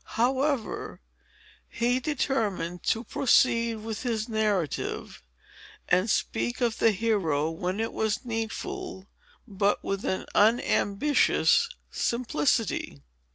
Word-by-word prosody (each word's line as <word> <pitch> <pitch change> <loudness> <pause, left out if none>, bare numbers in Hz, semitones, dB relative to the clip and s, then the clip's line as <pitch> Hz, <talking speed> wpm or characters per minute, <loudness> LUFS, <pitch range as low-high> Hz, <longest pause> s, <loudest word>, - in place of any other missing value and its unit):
However, 260 +1 0 0.7
he 245 +2 +1
determined 225 - -1
to 225 - +1
proceed 230 -2 +2
with 220 -2 -4
his 225 -3 -2
narrative, 205 - -2 0.7
and 185 +5 +2
speak 240 +3 -1
of 235 -3 0
the 225 - +5
hero 185 -8 0
when 180 +4 -3
it 225 - -2
was 220 +3 -1
needful, 230 - -4 0.4
but 200 -1 0
with 195 0 -3
an 190 - -2
unambitious 225 +4 +3 0.2
simplicity. 235 - -1
225 Hz, 100 wpm, -27 LUFS, 200-245 Hz, 0.7 s, the